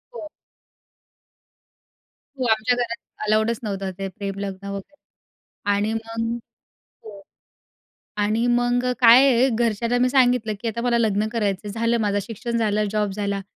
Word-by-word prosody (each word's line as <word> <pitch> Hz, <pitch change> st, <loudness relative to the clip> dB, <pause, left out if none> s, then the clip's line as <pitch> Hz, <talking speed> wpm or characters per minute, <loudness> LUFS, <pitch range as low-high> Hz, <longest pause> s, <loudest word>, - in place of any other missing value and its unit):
हो. 310 Hz, -, -7 dB, 2.1 s
हो. 260 Hz, -2 st, -2 dB
आमच्या 220 Hz, +3 st, +2 dB
घरात 235 Hz, -1 st, -2 dB, 0.3 s
अलाउडचं 220 Hz, +2 st, +2 dB
नव्हतं, 195 Hz, -2 st, -3 dB
ते 195 Hz, -, -2 dB
प्रेम 200 Hz, 0 st, -6 dB
लग्न 200 Hz, 0 st, -6 dB
वगैरे. 200 Hz, +9 st, -7 dB, 0.8 s
आणि 205 Hz, +2 st, 0 dB
मग 225 Hz, +1 st, -3 dB, 0.7 s
हो. 205 Hz, -2 st, -11 dB, 1.0 s
आणि 215 Hz, +3 st, +1 dB
मग 245 Hz, +1 st, +1 dB
अ, 250 Hz, -, +1 dB
काय 245 Hz, +3 st, +8 dB
आहे 250 Hz, +2 st, +4 dB
घरच्यांना 235 Hz, +1 st, 0 dB
मी 255 Hz, -, +3 dB
सांगितलं 245 Hz, -4 st, +3 dB
की 235 Hz, -, -3 dB
आता 235 Hz, +1 st, -3 dB
मला 240 Hz, -1 st, +2 dB
लग्न 215 Hz, -2 st, +1 dB
करायचंय. 205 Hz, -3 st, -2 dB
झालं 230 Hz, +2 st, 0 dB
माझं 205 Hz, -1 st, +1 dB
शिक्षण 235 Hz, +1 st, -4 dB
झालं, 215 Hz, -1 st, +1 dB
जॉब 210 Hz, -2 st, 0 dB
झाला. 200 Hz, 0 st, -2 dB
225 Hz, 140 wpm, -23 LUFS, 205-240 Hz, 2.1 s, काय